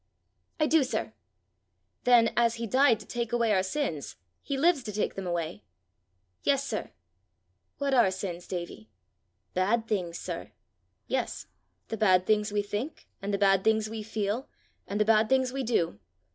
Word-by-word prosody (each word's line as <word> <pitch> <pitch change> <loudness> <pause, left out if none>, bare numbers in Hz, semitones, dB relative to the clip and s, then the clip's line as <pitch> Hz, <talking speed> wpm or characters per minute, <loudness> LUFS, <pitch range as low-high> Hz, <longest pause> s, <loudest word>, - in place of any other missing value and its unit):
"I 305 - +4
do, 310 -1 +4
sir." 260 - -3 0.9
"Then, 240 -2 +5
as 235 -1 +3
he 230 0 -4
died 255 0 +4
to - - -11
take 235 -2 -3
away 235 -2 +2
our 190 - +3
sins, 190 - -3 0.3
he 280 - -3
lives 320 0 +3
to 220 - -6
take 210 +1 -1
them 195 -1 -5
away!" 170 -1 -3 0.8
"Yes, 280 -1 +2
sir." 215 - -3 0.9
"What 280 -1 0
are 240 -7 +5
sins, 185 -2 -5
Davie?" 170 - -6 0.6
"Bad 220 +5 +1
things, 180 -6 -1
sir." - - -6 0.5
"Yes; - - -2 0.4
the 225 - -3
bad 185 -4 +4
things 210 0 +2
we 205 0 0
think, 210 +9 -5
and 200 +1 -3
the 200 - +1
bad 195 -1 +4
things 220 0 +2
we 225 -1 -4
feel, 215 +3 -2 0.4
and 205 - -2
the 210 - +4
bad 215 0 +4
things 260 -1 +2
we 270 - -2
do. 195 - 0
215 Hz, 165 wpm, -29 LUFS, 195-245 Hz, 0.9 s, Then